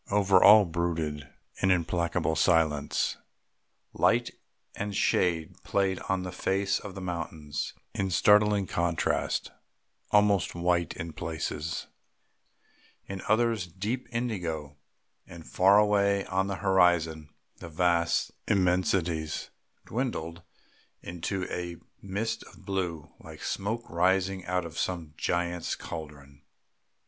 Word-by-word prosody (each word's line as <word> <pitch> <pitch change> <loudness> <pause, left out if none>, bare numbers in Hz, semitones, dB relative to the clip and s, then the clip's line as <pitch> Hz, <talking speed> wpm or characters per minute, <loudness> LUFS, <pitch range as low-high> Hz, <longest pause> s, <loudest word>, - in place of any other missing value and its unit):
Over 100 -2 +4
all 105 0 +9
brooded 80 -4 -2 0.3
an 95 - +3
implacable 85 -2 +1
silence; 80 -3 +2 0.8
light - - +2 0.4
and 100 0 -4
shade 85 -1 +1
played 95 -2 0
on 95 -1 0
the 90 - -5
face 95 +2 0
of 100 -2 -9
the 95 - -6
mountains 80 -4 -4 0.2
in 95 -1 -1
startling 105 +2 +4
contrast, 85 -2 -1 0.6
almost 105 -4 +3
white 85 -1 0
in 85 -3 -6
places, 80 -1 -4 1.2
in 95 -1 -6
others 110 -3 +2
deep 105 +9 -4
indigo; 90 - -3 0.5
and 85 -2 -11
far 100 +2 +5
away 100 -1 +3
on 95 +1 0
the 100 - -2
horizon 85 -5 +2 0.3
the 85 - -9
vast 85 0 +1 0.2
immensities 90 -4 +1 0.3
dwindled 90 -9 -3 0.6
into 90 +2 -3
a 85 -1 -4 0.3
mist 110 +4 -3
of - - -17
blue, 90 -6 -3
like - - -11
smoke 110 +4 -3
rising 95 +2 +1
out 90 -1 0
of 85 0 -6
some 85 -4 -3
giant's 85 +1 -1
caldron. 70 -3 -9
90 Hz, 110 wpm, -28 LUFS, 85-100 Hz, 1.2 s, all